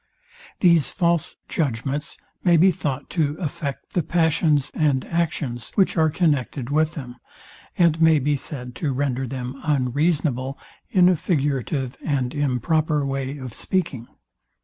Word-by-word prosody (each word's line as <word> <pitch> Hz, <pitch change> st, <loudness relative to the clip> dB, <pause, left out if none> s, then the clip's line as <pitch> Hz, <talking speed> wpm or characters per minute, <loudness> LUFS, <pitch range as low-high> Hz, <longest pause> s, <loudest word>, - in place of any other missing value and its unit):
These 170 Hz, -5 st, +5 dB
false 170 Hz, -4 st, 0 dB
judgments 140 Hz, 0 st, -2 dB, 0.3 s
may 175 Hz, -2 st, +5 dB
be 185 Hz, +4 st, +6 dB
thought 145 Hz, -5 st, -3 dB
to 150 Hz, -3 st, 0 dB
affect 155 Hz, -4 st, -5 dB
the 175 Hz, -, +2 dB
passions 160 Hz, -3 st, +2 dB
and 145 Hz, -4 st, +1 dB
actions, 150 Hz, -8 st, -2 dB
which 195 Hz, -, +3 dB
are 160 Hz, -2 st, +3 dB
connected 145 Hz, -, 0 dB
with 155 Hz, +2 st, +1 dB
them, 125 Hz, -5 st, -7 dB, 0.6 s
and 165 Hz, -2 st, +3 dB
may 160 Hz, -1 st, +6 dB
be 145 Hz, +1 st, +1 dB
said 125 Hz, -2 st, -7 dB
to 145 Hz, -5 st, -1 dB
render 135 Hz, -1 st, -1 dB
them 130 Hz, +1 st, -6 dB
unreasonable, 140 Hz, -1 st, 0 dB, 0.3 s
in 180 Hz, -2 st, +5 dB
a 185 Hz, -, +5 dB
figurative 140 Hz, -4 st, -1 dB
and 135 Hz, -5 st, -1 dB
improper 145 Hz, +2 st, +1 dB
way 135 Hz, +1 st, -3 dB
of 130 Hz, -4 st, -7 dB
speaking. 140 Hz, -11 st, -2 dB
145 Hz, 135 wpm, -23 LUFS, 130-160 Hz, 0.6 s, be